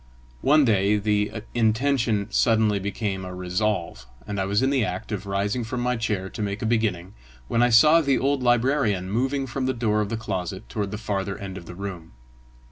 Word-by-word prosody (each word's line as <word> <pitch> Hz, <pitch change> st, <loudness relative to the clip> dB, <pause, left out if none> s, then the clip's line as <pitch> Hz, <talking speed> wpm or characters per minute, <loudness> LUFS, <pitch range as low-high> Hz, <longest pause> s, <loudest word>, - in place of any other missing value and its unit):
One 150 Hz, +1 st, +5 dB
day 105 Hz, -2 st, +3 dB
the 105 Hz, +1 st, -1 dB
intention 115 Hz, -2 st, +1 dB
suddenly 110 Hz, -3 st, +3 dB
became 100 Hz, 0 st, -3 dB
a 90 Hz, 0 st, -7 dB
resolve, 90 Hz, -, -2 dB, 0.2 s
and 100 Hz, -1 st, -4 dB
I 95 Hz, -, 0 dB
was 100 Hz, +5 st, +1 dB
in 135 Hz, -, +2 dB
the 135 Hz, -4 st, +2 dB
act 90 Hz, +1 st, -4 dB
of 100 Hz, -1 st, -4 dB
rising 100 Hz, +5 st, -1 dB
from 120 Hz, +2 st, -4 dB
my 125 Hz, 0 st, 0 dB
chair 105 Hz, -5 st, -2 dB
to 110 Hz, -, -7 dB
make 100 Hz, +1 st, -3 dB
a -, -, -1 dB
beginning, 105 Hz, -5 st, 0 dB, 0.3 s
when 115 Hz, -, +1 dB
I 120 Hz, -, +4 dB
saw 150 Hz, +8 st, +6 dB
the 140 Hz, -4 st, +2 dB
old 140 Hz, 0 st, 0 dB
librarian 120 Hz, -6 st, +1 dB
moving 135 Hz, +5 st, 0 dB
from 130 Hz, +1 st, -3 dB
the 130 Hz, -, 0 dB
door 105 Hz, -3 st, +1 dB
of 105 Hz, -, -2 dB
the 115 Hz, -, -2 dB
closet 95 Hz, -2 st, -4 dB
toward 105 Hz, -3 st, -3 dB
the 105 Hz, -, -5 dB
farther 100 Hz, -2 st, -3 dB
end 95 Hz, -2 st, -7 dB
of 85 Hz, -4 st, -9 dB
the 90 Hz, -, -8 dB
room. 90 Hz, -5 st, -7 dB
105 Hz, 205 wpm, -24 LUFS, 100-120 Hz, 0.3 s, saw